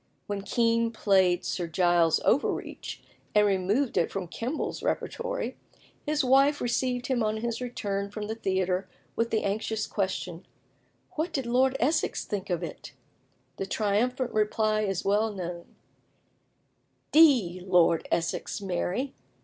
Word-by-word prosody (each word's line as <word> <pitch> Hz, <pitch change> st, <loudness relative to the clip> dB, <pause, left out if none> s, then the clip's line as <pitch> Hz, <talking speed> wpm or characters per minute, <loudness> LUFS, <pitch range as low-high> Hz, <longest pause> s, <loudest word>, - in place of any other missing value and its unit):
When 205 Hz, -1 st, -3 dB
Kean 230 Hz, +2 st, +2 dB
played 190 Hz, -5 st, +2 dB
Sir 175 Hz, -2 st, -2 dB
Giles 170 Hz, -1 st, +3 dB
Overreach, 275 Hz, -, -1 dB, 0.3 s
and 210 Hz, 0 st, +6 dB
removed 200 Hz, +7 st, +1 dB
it 170 Hz, -, +2 dB
from 190 Hz, -3 st, -4 dB
Kemble's 240 Hz, -, -3 dB
repertory, -, -, -2 dB, 0.5 s
his 300 Hz, -1 st, +1 dB
wife 275 Hz, +3 st, +4 dB
received 245 Hz, +1 st, -1 dB
him 255 Hz, -2 st, 0 dB
on 215 Hz, 0 st, 0 dB
his 235 Hz, +2 st, -3 dB
return 200 Hz, -5 st, -3 dB
from 210 Hz, +1 st, -5 dB
the 215 Hz, -, -3 dB
theatre 190 Hz, -3 st, -1 dB, 0.3 s
with 230 Hz, 0 st, 0 dB
the 220 Hz, -, 0 dB
anxious 220 Hz, +2 st, -1 dB
question, 185 Hz, -3 st, -3 dB, 0.6 s
"What 320 Hz, +3 st, -2 dB
did 270 Hz, -5 st, -2 dB
Lord 260 Hz, +2 st, +2 dB
Essex 300 Hz, +5 st, +1 dB
think 200 Hz, -2 st, -4 dB
of 175 Hz, -2 st, -1 dB
it?" -, -, -8 dB, 0.6 s
The 195 Hz, -, -3 dB
triumphant 235 Hz, +6 st, 0 dB
reply 215 Hz, 0 st, +1 dB
is 195 Hz, -3 st, -2 dB
well 210 Hz, +3 st, +2 dB
known: 175 Hz, -3 st, -7 dB, 1.4 s
"D 245 Hz, -, +5 dB
Lord 175 Hz, -3 st, +3 dB
Essex, 165 Hz, 0 st, -1 dB
Mary! 195 Hz, +7 st, -2 dB
210 Hz, 135 wpm, -28 LUFS, 190-245 Hz, 1.4 s, and